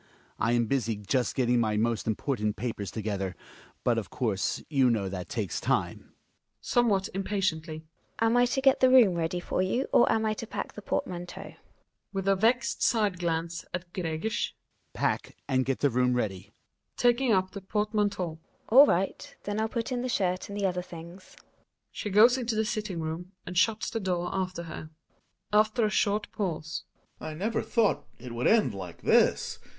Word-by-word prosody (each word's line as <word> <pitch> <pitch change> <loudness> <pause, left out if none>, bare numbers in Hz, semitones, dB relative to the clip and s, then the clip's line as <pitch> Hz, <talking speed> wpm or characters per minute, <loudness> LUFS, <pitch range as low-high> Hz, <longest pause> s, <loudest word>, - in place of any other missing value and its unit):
I 115 - +2
am 120 -1 +3
busy 115 -2 0
just 105 +5 -1
getting 125 -2 +2
my 110 -2 +1
most 115 0 0
important 110 -1 -1
papers 105 -2 -4
together. 100 -4 -3 0.5
But, 120 -2 +2
of 110 - -8
course, 105 -6 -1
you 135 -4 +3
know 110 -5 0
that 95 -1 -5
takes 105 -6 -3
time. - - 0
Gina - - -25 0.5
(somewhat 210 -6 +1
impatiently). 175 -5 -2 0.3
Am 225 +1 +2
I 245 0 +5
to 270 +2 -1
get 270 0 +5
the 255 - +5
room 245 -7 +7
ready 170 +1 -1
for 175 - -1
you, 240 +8 0
or - - +5
am 220 0 +1
I 215 - +1
to 225 +1 -7
pack - - -5
the - - -8
portmanteau? 175 -9 -4 0.6
Hjalmar - - -15
(unth 195 0 -2
a 195 - +5
vexed 235 +5 +1
side 210 -6 +2
glance 170 0 -2
at 180 -1 -7
Gregers). 175 +5 -2 0.4
Pack - - -1
— - - -44
and 130 -1 +1
get 135 -1 -1
the 145 - +3
room 125 +1 +2
ready! 100 -6 -1
Gina - - -28 0.5
(taking 245 +1 +3
up 185 -2 +2
the 200 - -7
portmanteau). 205 -4 -1 0.3
All 275 +6 +9
right, 190 +3 -1
then 205 +1 -2
I'll 220 - 0
put 230 +1 -3
in 245 -1 -1
the 255 - -2
shirt 185 -5 0
and 200 0 -5
the 200 - +1
other 180 -1 0
things. 175 +2 -11 0.6
She 210 - -4
goes 230 +6 +6
into 235 -2 -2
the 220 0 +1
sitting 210 -5 -3
room 165 +4 -5
and 180 - -6
shuts 215 +4 +2
the 225 - -2
door 180 -3 -1
after 185 -2 -2
her, 155 -1 -8
Gregers - - -31 0.7
(after 225 +1 0
a 210 - 0
short 210 0 +1
pause). 160 -6 -3 0.3
I 155 -1 -6
never 215 +8 -1
thought 230 -4 +1
it 125 0 -9
would 120 +1 0
end 225 -1 +4
like 90 -4 -8
this. - - +3
180 Hz, 190 wpm, -28 LUFS, 130-215 Hz, 0.7 s, All